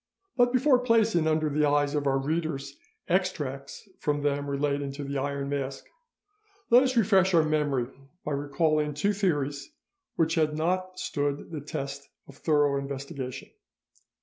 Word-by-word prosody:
But 245 -1 +4
before 260 +1 +4
placing 225 -9 +3
under 155 0 +2
the 150 0 +2
eyes 145 0 +2
of 145 -1 0
our 135 0 +2
readers 140 -1 -2 0.3
extracts 150 -5 -2
from 145 -1 -1
them 145 0 0
relating 140 0 -1
to 145 +1 -6
the 140 0 -3
Iron 140 0 -2
Mask, 135 -1 -3 0.9
let 245 +2 +8
us 260 -2 0
refresh 190 -4 +4
our 165 - +6
memory 150 -5 +1 0.4
by 150 - -2
recalling 150 +1 0
two 200 +8 +1
theories 145 - -1 0.5
which 165 0 +2
had 155 -2 +1
not 185 +3 -1
stood 145 -3 -2
the 155 -3 -5
test 140 -1 -6 0.2
of 140 - -13
thorough 145 -3 +2
investigation. 140 -2 -6
145 Hz, 150 wpm, -27 LUFS, 140-170 Hz, 0.9 s, let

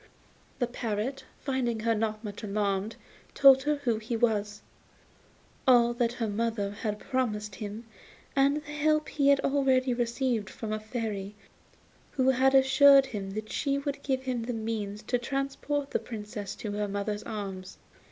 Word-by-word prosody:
The 245 - +1
parrot, 240 +2 -3 0.2
finding 255 -5 -1
she - - -7
was 230 -1 +3
not 215 0 -2
much 205 -2 -6
alarmed, 205 0 -1 0.4
told 270 -1 +8
her 300 +2 +1
who 250 -6 -1
he 225 +2 -3
was, 210 -3 0 1.0
all 240 -2 +6
that 240 0 0
her 235 -2 -2
mother 210 -1 -1
had 210 0 -3
promised 210 -5 -2
him 210 +3 -7 0.5
and 280 +1 +4
the 295 - -9
help 305 +1 +1
he 280 -2 +1
had 280 -1 +6
already 265 -2 +2
received 240 -3 -1
from 215 +2 -5
a 215 - -2
Fairy 215 -3 -4 0.8
who 265 -1 +3
had 265 +1 +3
assured 270 +1 +7
him 200 -6 -5
that 215 0 -5
she 280 -2 0
would 280 0 -4
give 265 -2 -1
him 250 -3 -2 0.2
means 210 -2 -3
to 245 - 0
transport 275 +2 -2
the - - +1
Princess 210 -3 -6
to 210 - -5
her 205 0 -2
mother's 205 +1 -3
arms. 195 -3 -6
235 Hz, 160 wpm, -29 LUFS, 210-265 Hz, 1.0 s, told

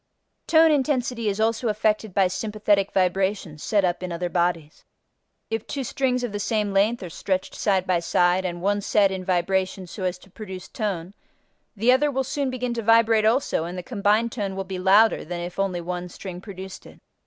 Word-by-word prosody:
Tone 320 -1 +6
intensity 255 -6 0
is 200 +1 -3
also 225 +2 +1
affected 215 0 0
by 195 +1 +3
sympathetic 205 +1 0
vibrations 190 -3 0
set 205 -3 +2
up 175 0 -1
in 180 -1 -4
other 175 +1 -3
bodies. 170 -3 -1 0.7
If 225 -1 -3
two 275 - -3
strings 250 0 -1
of 245 - -2
the 205 - -4
same 210 -1 -1
length 205 +3 +2
are 180 - -6
stretched 185 +2 -2
side 190 -3 +1
by 180 -2 +2
side 175 +2 +2
and 175 -1 -4
one 205 +1 +1
set 200 -1 +3
in 190 -1 -4
vibration 185 +1 0
so 180 +3 -9
as 180 0 -1
to 190 +1 -20
produce 190 -3 -8
tone 195 -5 -4 0.6
the 225 +4 +3
other 285 +3 +3
will 265 -1 -1
soon 275 +1 -2
begin 250 -1 -3
to 235 - -3
vibrate 225 0 +4
also 225 - +1
and 175 +2 -6
the 180 - -5
combined 215 +2 +1
tone 200 -5 -3
will 195 - -3
be 185 -1 -6
louder 200 +4 +4
than 175 +2 -5
if 175 +2 -6
only 185 -3 0
one 180 +1 -5
string 180 0 -8
produced 190 -1 -9
it. - - -15
195 Hz, 200 wpm, -24 LUFS, 180-225 Hz, 0.7 s, Tone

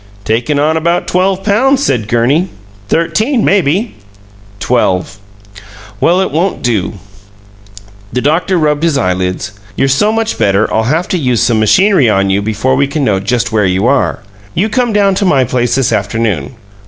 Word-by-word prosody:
"Taken 120 +7 0
on 155 +2 +1
about 170 +2 0
twelve 190 +1 0
pounds," 260 +7 +2
said 110 -4 -1
Gurney. 125 +10 +1 0.4
"Thirteen, 220 - 0
maybe." 195 +4 +1 0.7
"Twelve." 95 -4 -1 0.8
"Well, 175 +2 +2
it 190 - -2
won't 170 +6 -1
do." 110 -7 -1 1.2
The 125 - -1
doctor 160 +8 0
rubbed 150 -2 +1
his 165 -4 +1
eyelids. 95 -2 -2 0.2
"You're 135 - +1
so 135 +11 +2
much 225 0 -2
better 100 +2 +2
I'll 110 0 +1
have 165 +5 0
to 185 - 0
use 125 -5 +1
some 115 -2 +1
machinery 130 - +3
on 100 -2 +1
you 100 +1 +1
before 110 +5 -1
we 140 +1 +1
can 145 +1 -2
know 100 -6 +1
just 115 +2 -1
where 105 -3 +1
you 95 +3 0
are. 140 +2 +1 0.3
You 205 +6 0
come 245 +1 0
down 200 -2 +2
to - - +2
my 140 -8 +3
place 120 0 -1
this 135 -3 +1
afternoon. 105 - -2
135 Hz, 165 wpm, -12 LUFS, 110-180 Hz, 1.2 s, machinery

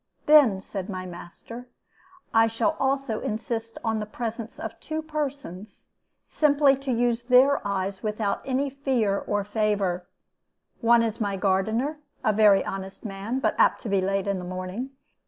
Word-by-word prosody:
'Then,' 275 -11 +6
said 195 -1 -6
my 185 -2 -4
master, 185 +7 -10 0.7
'I 225 0 +5
shall 225 +8 0
also 270 -4 0
insist 225 +1 -4
on 225 -1 0
the 210 - -4
presence 230 0 -5
of - - -6
two 315 0 -4
persons, 280 - -5 0.4
simply 285 -2 +3
to 275 0 -4
use 240 0 +1
their 255 +3 +5
eyes 195 -1 -2
without 210 -1 -1
any 270 +1 0
fear 255 -8 0
or 205 -1 -1
favor. 205 -4 -1 0.7
One 235 0 +5
is 225 0 -3
my 200 -2 -1
gardener, 220 +10 0 0.2
a 215 - +3
very 205 -2 +5
honest 195 +3 -6
man, 205 +4 -3
but 265 - +1
apt - - +4
to 225 - -5
be 195 -1 +2
late 195 +1 0
in 200 -2 -1
the - - -6
morning. 185 +7 -5
220 Hz, 155 wpm, -26 LUFS, 195-260 Hz, 0.7 s, Then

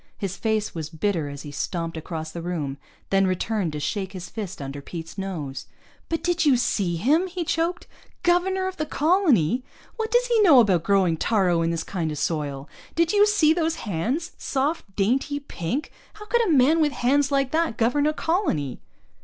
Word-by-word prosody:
His 195 -2 -3
face 220 -1 -1
was 160 -2 -5
bitter 165 -2 -1
as 140 0 -8
he 145 - -8
stomped 165 +3 -3
across 160 0 -5
the 170 - -6
room, 155 -6 -3 0.3
then 195 0 +4
returned 185 -1 -1
to 150 - -3
shake 195 +5 -3
his 185 -1 -7
fist 205 -4 -6
under 140 0 -6
Pete's 165 +2 -8
nose. 160 -9 -5 0.4
"But 330 - -2
did 350 0 +1
you 280 -5 +5
see 195 -7 0
him?" 295 - +2
he 360 -1 -4
choked. 335 +2 -1 0.4
"Governor 375 +2 +2
of 375 - -5
the 310 - -2
colony! 285 - +2 0.3
What 445 -1 -2
does 485 +1 +3
he 475 -3 +3
know 320 -10 +8
about 195 -7 +4
growing 185 -3 +2
taaro 180 -4 +2
in 165 - +1
this 165 -1 -2
kind 170 -5 -3
of 150 - -5
soil? 145 -3 -2 0.3
Did 335 +2 +2
you 415 0 +6
see 350 -7 +4
those 325 -1 0
hands? 230 - -2
Soft, 285 +4 -1
dainty, 265 +8 +1
pink! 270 - -4 0.2
How 420 - -10
could 475 +2 +2
a - - +2
man 300 +3 +5
with 295 -2 +2
hands 280 +3 +2
like 275 -1 +1
that 320 -8 0
govern 285 +6 +2
a 305 - +1
colony?" 305 - -1
220 Hz, 190 wpm, -24 LUFS, -, 0.4 s, know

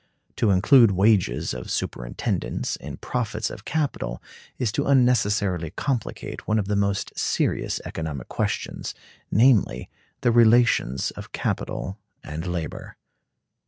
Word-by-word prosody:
To 110 - +2
include 110 +5 +6
"wages 95 - +2
of - - -7
superintendence" - - -2
in - - -8
profits 110 -3 -2
of 105 - -10
capital 145 - -2 0.4
is 120 -5 0
to - - -1
unnecessarily 105 - +2
complicate 130 -6 -3
one 110 - +2
of 100 -3 0
the 105 - 0
most 100 0 -1
serious - - 0
economic 80 -6 -5
questions—namely, 110 - 0 0.3
the 120 - +3
relations 115 - +4
of - - -10
capital 95 +3 -3 0.2
and 80 +4 -5
labor. 85 -3 -5
105 Hz, 115 wpm, -24 LUFS, 90-120 Hz, 0.4 s, include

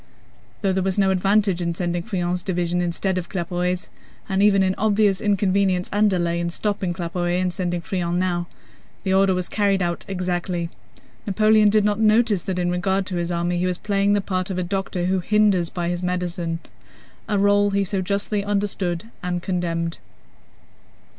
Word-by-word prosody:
Though 195 -2 +1
there 190 - +1
was 190 +1 -1
no 195 -1 +3
advantage 195 0 +2
in 170 -1 -1
sending 175 0 -1
Friant's 180 0 -2
division 175 -1 -1
instead 180 +2 -1
of 175 - -8
Claparède's, 180 0 -2 0.4
and 190 -1 0
even 200 -1 +5
an 185 0 +2
obvious 205 -2 +2
inconvenience 195 -2 +1
and 210 +1 +4
delay 170 -2 0
in 170 0 -1
stopping 200 0 -2
Claparède 175 +1 -2
and 185 -1 0
sending 175 -2 -2
Friant 175 -1 -2
now, 175 -1 0 0.6
the 190 - 0
order 190 -1 +4
was 180 -1 -2
carried 200 -3 +1
out 175 -1 -2
exactly. 180 -2 -2 0.6
Napoleon 215 +1 +4
did 210 0 +3
not 210 0 +1
notice 220 -2 +3
that 185 +1 -3
in 175 0 0
regard 190 +2 0
to 185 -2 -4
his 170 0 -1
army 175 0 -1
he 180 - +1
was 180 -1 -1
playing 200 0 +1
the 205 - +2
part 185 -1 -2
of 190 - -3
a 185 - 0
doctor 185 -1 -2
who 185 +1 +1
hinders 200 -3 +2
by 175 -1 -3
his 175 0 -2
medicines—a 180 +3 -5
role 205 +1 +4
he 200 0 +1
so 195 0 -1
justly 200 +2 -1
understood 200 -4 -1 0.2
and 180 -2 -3
condemned. 170 -3 -2
185 Hz, 175 wpm, -22 LUFS, 175-200 Hz, 0.6 s, even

